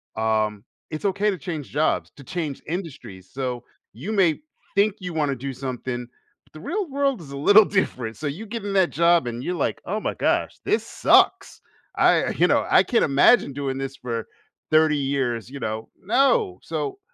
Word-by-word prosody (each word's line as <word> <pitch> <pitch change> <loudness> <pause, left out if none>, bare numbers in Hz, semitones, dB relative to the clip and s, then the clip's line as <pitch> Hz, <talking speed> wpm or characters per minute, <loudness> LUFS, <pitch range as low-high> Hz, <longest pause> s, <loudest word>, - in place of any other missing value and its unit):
um, 110 -1 0 0.3
"It's 155 +5 -6
okay 200 +2 +1
to 190 - -2
change 155 -4 -6
jobs, 150 +2 0
to 140 - -13
change 160 -4 -4
industries." 145 - -7
So, 125 -2 -4 0.3
you 155 - -6
may 180 - +2 0.3
think 205 0 +3
you 180 -2 -6
wanna 145 -3 0
do 135 +2 -5
something, 125 -1 -5 0.4
but - - -31
the 155 - -10
real 410 - -2
world 275 -6 0
is 140 -3 -11
a 140 - -6
little 205 +8 +7
different. 125 - -1
So, 155 - -4
you 175 +11 -5
get 225 0 -6
in 200 - -3
that 190 -3 +3
job 170 -3 +3
and 120 +2 -5
you're, 180 - -2
like, 150 - -2
"Oh 210 +4 -2
my - - -2
gosh, - - 0
this 430 +2 0
sucks. - - +3 0.3
I, - - +3
you - - +3
know, - - +2
I - - +6
can't 240 - +2
imagine 140 - +4
doing 135 -1 -3
this 135 0 -5
for 115 -2 -4 0.4
30 155 -1 +4
years," 130 -5 -1
you 140 0 -8
know, 110 -1 -4
no, 275 - +2
so, 405 -1 -4
150 Hz, 190 wpm, -23 LUFS, 130-195 Hz, 0.4 s, little